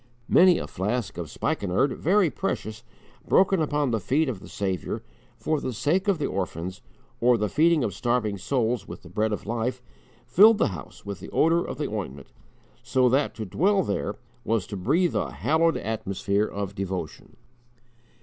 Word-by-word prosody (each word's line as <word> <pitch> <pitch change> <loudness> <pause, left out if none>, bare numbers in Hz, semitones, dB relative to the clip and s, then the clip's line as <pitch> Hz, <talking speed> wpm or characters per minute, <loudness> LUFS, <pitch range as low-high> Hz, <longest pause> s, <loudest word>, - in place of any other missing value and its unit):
Many 180 -1 +6
a - - -3
flask 105 0 -3
of 85 -4 -5
spikenard, 100 - 0
very 185 -1 +2
precious, 110 -1 -4 0.4
broken 190 -2 +4
upon 145 -3 0
the 115 - +1
feet 145 - +1
of 110 -7 -4
the - - -12
Saviour, 95 -4 -3 0.3
for 155 -2 -1
the 130 - -3
sake 150 - 0
of 200 -3 +3
the 150 - -2
orphans, 90 -1 -4 0.4
or 120 0 +4
the 105 -1 0
feeding 160 +3 +3
of 105 -5 -1
starving 120 -4 -1
souls 120 -2 -1
with - - -9
the 90 - -12
Bread 110 +4 0
of 105 - -4
Life, 120 +2 -2 0.5
filled 215 +4 +6
the - - +2
house 85 -7 -10
with 100 -2 -5
the - - -9
odour 165 +2 +3
of - - -6
the 150 - -2
ointment, 70 -11 -6 0.5
so 130 -1 +2
that 135 +3 +1
to 110 -1 -5
dwell 190 - +2
there 100 -2 -2 0.3
was 110 -4 0
to 105 - -7
breathe 155 - +1
a - - -1
hallowed 165 +2 +2
atmosphere 100 -1 -1
of 100 -1 -4
devotion. 95 -5 -5
115 Hz, 175 wpm, -26 LUFS, 100-150 Hz, 0.5 s, Many